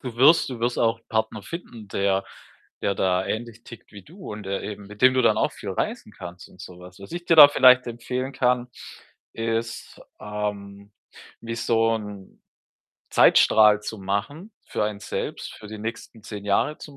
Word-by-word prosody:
du 125 -3 -7
wirst 145 +7 +5
du 120 -3 -7
wirst 120 +1 -1
auch 115 -1 +1
‘n 115 - -34
Partner 110 -1 -2
finden, 115 - -9
der 100 0 0 0.6
der 100 - 0
da 95 0 +1
ähnlich 115 +2 -5
tickt 115 - -14
wie 100 -2 -11
du 180 - -13
und 105 0 -8
der 95 0 -3
eben 105 -1 -7
mit 105 +2 -12
dem 130 0 +6
du 130 - +2
dann - - +3
auch - - +1
viel - - -7
reisen - - -4
kannst 90 +1 -10
und 90 - -18
so 90 0 -11
was. 90 +1 -14
Was 100 +7 -12
ich 175 0 -5
dir 165 - +4
da 150 -2 +12
vielleicht 130 -2 +5
empfehlen 125 +3 -4
kann, 125 -1 +1 0.7
ist, 115 0 -4 0.2
ähm, 100 -1 -6 0.5
wie 115 0 -5
so 115 -1 +1
‘n 105 -3 -10 0.7
Zeitstrahl 105 -1 +5
zu 110 +1 -6
machen 110 - -4 0.2
für - - -1
einen 105 -1 -4
selbst, - - -5
für 105 - -12
die 110 0 -8
nächsten 115 +1 -7
10 105 -1 -8
Jahre 105 +9 0
zum 145 -2 -12
110 Hz, 190 wpm, -24 LUFS, 100-125 Hz, 0.7 s, da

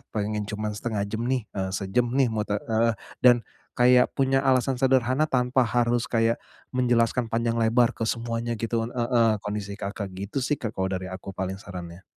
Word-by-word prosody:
pengen 105 0 -1
cuman 105 0 -3
setengah 105 -1 -2
jam 110 +3 -4
nih, 130 -3 0
eee, 95 -1 -3
sejam 100 +6 0
nih, 135 -2 +4
mau 110 - -1
te" 105 - 0 0.2
heeh. 115 +1 +3 0.3
Dan, 120 -2 +6 0.4
kayak 125 0 +5
punya 135 0 +1
alasan 130 0 +2
sederhana 130 +2 +3
tanpa 125 -1 +2
harus 120 0 +1
kayak, 115 0 +2 0.4
menjelaskan 120 -1 +2
panjang 115 0 0
lebar 115 +1 +3
ke - - -3
semuanya 115 +1 -2
gitu 115 0 -1
heeh, 120 -2 +2
kondisi 105 -1 -4
Kakak, 100 0 -4
gitu 100 +8 -4
sih, 150 - +1
Kak 110 -4 -4
kalau 95 0 0
dari 95 -1 -3
aku 95 +1 -7
paling 95 0 -3
sarannya. 90 -2 -9
115 Hz, 175 wpm, -26 LUFS, 105-125 Hz, 0.4 s, Dan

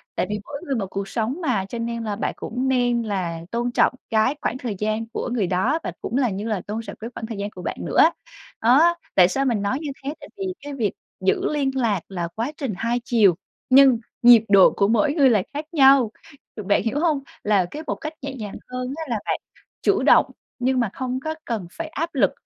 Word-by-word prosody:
tại - - 0
vì 210 0 -2
mỗi 285 - -8
người 275 - -1
một 200 -5 -2
cuộc 195 0 -4
sống 240 - -2
mà, 230 -11 0
cho 235 - -5
nên 235 0 -3
là 210 -2 -2
bạn - - -2
cũng 250 +4 -3
nên 245 -2 +2
là 180 -6 -3
tôn 240 +1 -1
trọng - - +3 0.2
cái 225 +5 +2
khoảng 245 - -1
thời 245 -6 -4
gian 215 +1 -1
của - - -3
người 210 -7 0
đó 195 - +1
và - - -3
cũng 245 - -2
là 255 -3 +2
như 205 +2 -4
là 210 -5 -1
tôn 215 +2 -3
trọng 230 - -8
cái 225 - -6
khoảng 225 - -6
thời 225 -2 -6
gian 200 +1 -3
của 185 - -11
bạn - - -4
nữa. - - 0 0.6
Đó, 295 +9 +5 0.2
tại 180 -2 +7
sao 270 +9 -1
mình 235 -6 +1
nói 200 +6 0
như 305 - -4
thế? 280 - -3
Tại - - -11
vì 390 - -3 0.2
cái 290 0 -7
việc 225 -8 -1 0.3
giữ 190 +9 +1
liên 275 -2 +1
lạc 230 -7 +1
là 175 -3 -3
quá 235 +6 -2
trình 270 -7 -3
hai 235 +3 0
chiều, 210 -9 +4 0.3
nhưng 265 -2 +7 0.2
nhịp 235 -2 +8
độ 195 -2 +7
của 200 - +3
mỗi 280 +7 +2
người 285 -4 +5
là 210 -6 +3
khác 295 +2 -4
nhau, 270 -7 +5 0.5
bạn 205 - +2
hiểu 235 +5 -1
hông? 310 -3 +2 0.2
Là 205 -3 +3
cái 305 - -6
một - - -1
cách 310 0 -6
nhẹ 275 0 -5
nhàng 210 -5 -6 0.2
hơn 255 +1 -3
á 325 - -3
là 230 -3 -1
bạn - - -1 0.4
chủ - - +2
động, - - +6 0.3
nhưng 255 +1 +1
mà 235 -4 +1
không 255 0 -3
có 315 +4 -4
cần 215 -7 -3
phải 330 - -5
áp 325 +2 -4
lực. - - +3
235 Hz, 240 wpm, -23 LUFS, 210-270 Hz, 0.6 s, nhịp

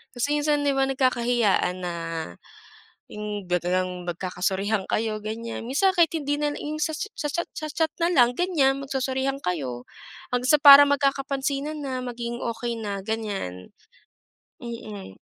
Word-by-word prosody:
kasi 285 +5 0
minsan 295 0 +1
di 285 - +2
ba 270 0 +2
nagkakahiyaan 240 -8 +1
na 175 -1 -3 1.1
yung 210 -3 -6
biglang 180 0 -1
magkakasorihan 190 +3 -1
kayo, 215 -1 -1
ganiyan. 225 +2 -5
Minsan 375 +10 +2
kahit 335 -1 +4
hindi 290 -2 -1
nalang 295 0 -2
yung 300 +1 -4
sa 310 +1 -1
cha 425 +8 -4
sa - - -4
cha 320 +4 -1 0.2
sa 310 - -4
chat 320 -1 +1
nalang, 270 -9 +3
ganiyan, 300 -7 +2
magsosorihan 265 0 -2
kayo. 135 - -3 0.5
Hanggang 250 +3 +1
sa 300 - +6
parang 285 -1 +10
magkakapansinan 275 +2 -1
na, 255 -2 -4
maging 240 -1 -4
okey 235 0 -3
na, 205 -3 -4
ganiyan. 200 - -4 0.9
Mm. 215 - -8
245 Hz, 140 wpm, -25 LUFS, 205-285 Hz, 1.1 s, parang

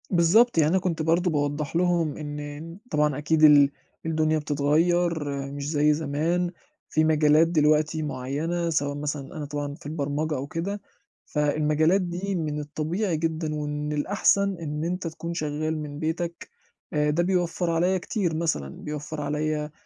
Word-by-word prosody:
بالضبط، 190 +6 +4
يعني 155 -2 +5
أنا 190 +3 +3
كنت 175 -3 -2
برضه 170 +3 +2
باوضح 145 0 -1
لهُم 170 -3 +1
إن 150 +2 -7
طبعًا 150 -2 +2
أكيد 155 +1 +1
ال 145 -2 +8 0.3
الدُنيا 155 -1 +1
بتتغير، 160 +3 +1 0.3
مش 140 0 -4
زي 150 -1 +3
زمان، 160 +4 0 0.4
في 155 - +2
مجالات 155 0 +4
دلوقتي 155 -1 +2
معيّنة 150 +5 -2
سواء 145 -3 0
مثلًا 145 -1 -4
أنا 150 - -4
طبعًا 145 0 -4
في - - -18
البرمجة 150 +1 -2
أو 135 +2 -4
كده. 195 +7 -3 0.4
فالمجالات 155 +4 +2
دي 185 +2 -3
من 155 -3 -2
الطبيعي 160 +5 -2
جدًا 160 -1 -2
ومن 150 0 -3
الأحسن 200 +4 +2
إن 150 -2 -4
أنت 180 +1 -2
تكون 165 +1 -5
شغال 155 0 -2
من 150 -1 -6
بيتَك، 170 +2 -3 0.4
ده 150 +2 +1
بيوفّر 175 -1 0
عليا 175 +3 +2
كتير 180 -2 -2
مثلًا. 155 - -1
بيوفّر 150 0 -5
عليّا 150 +1 -2
155 Hz, 145 wpm, -26 LUFS, 150-170 Hz, 0.4 s, ال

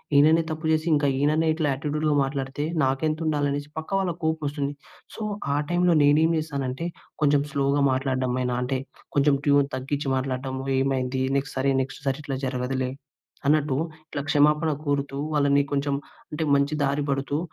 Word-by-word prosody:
"ఈననే 155 +3 +6
తప్పు 155 +1 -4
చేసి 155 +1 +1
ఇంకా 145 -1 +3
ఈననే 155 +3 +2
ఇట్లా 155 -1 -1
యాటిట్యూడ్‌లో 150 +2 -1
మాట్లాడితే 135 +1 -2 0.2
నాకెంతుండాలి" 150 +2 0
అనేసి 145 +1 -4
పక్క 160 - -5
వాళ్ళకి 175 -3 -2
కోపమొస్తుంది. 145 -3 -1 0.4
సో, - - -9 0.3
ఆ - - +1
టైంలో 175 0 +3
నేనేమి 155 +3 +4
చేశానంటే 140 -1 -3 0.4
కొంచెం 145 -1 +4
స్లోగా 140 -1 +1
మాట్లాడడం 130 -1 0
అయిన 125 0 -1
అంటే 130 +1 -1 0.4
కొంచెం 140 0 +4
ట్యూన్ 140 -1 +4
తగ్గించి 135 +2 -2
మాట్లాడడము. 130 0 -3 0.2
ఏమైంది? 130 -1 0 0.2
నెక్స్ట్ 140 +1 -4
సరే, 135 +1 +2
నెక్స్ట్ 135 +1 -6
సారి 135 +2 0
ఇట్లా 135 -2 -3
జరగదులే 130 0 -2 0.6
అన్నట్టు, 150 -2 +2 0.3
ఇట్ల 145 - -3
క్షమాపణ 150 +2 +4
కోరుతూ 140 -1 -1 0.2
వాళ్ళని 140 -1 +3
కొంచెం 140 0 0 0.4
అంటే 150 +1 -2
మంచి 140 +2 +1
దారి 140 +1 0
పడుతూ 135 +1 -1
140 Hz, 150 wpm, -25 LUFS, 135-150 Hz, 0.6 s, ఈననే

